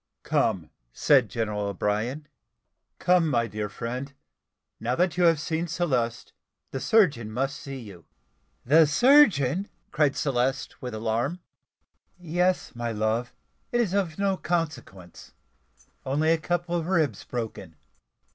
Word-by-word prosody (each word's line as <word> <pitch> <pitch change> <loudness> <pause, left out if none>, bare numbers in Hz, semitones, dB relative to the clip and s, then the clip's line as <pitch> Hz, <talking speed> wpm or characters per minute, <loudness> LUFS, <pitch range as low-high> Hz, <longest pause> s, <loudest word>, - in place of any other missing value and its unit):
"Come," - - 0 0.2
said 130 - +4
General 105 0 -2
O'Brien; 105 - -2 0.7
"come, 180 -2 +3
my 120 -5 +1
dear 105 -1 -4
friend, 125 +6 -5 0.7
now 120 +3 -1
that 180 +2 +1
you 180 -1 +3
have 165 -3 +4
seen 160 +2 -2
Celeste, 130 -9 -1 0.4
the 135 - -3
surgeon 140 - +2
must 135 +4 -2
see 140 -1 -7
you." 100 -9 -11 0.6
"The 155 +5 +6
surgeon!" 195 - +4 0.2
cried 150 -2 +2
Celeste 135 0 -1
with 125 -4 -5
alarm. 115 +10 -1 0.8
"Yes, 180 +2 0
my 120 0 -3
love; 110 +3 -1 0.4
it 240 - +1
is 210 -6 +1
of 185 -6 -1
no 195 -1 +1
consequence 130 - -4 0.7
only 150 +4 +1
a 165 - +2
couple 175 +1 -2
of 165 -1 -2
ribs 155 - 0
broken." 110 -8 -6
140 Hz, 130 wpm, -26 LUFS, 115-170 Hz, 0.8 s, The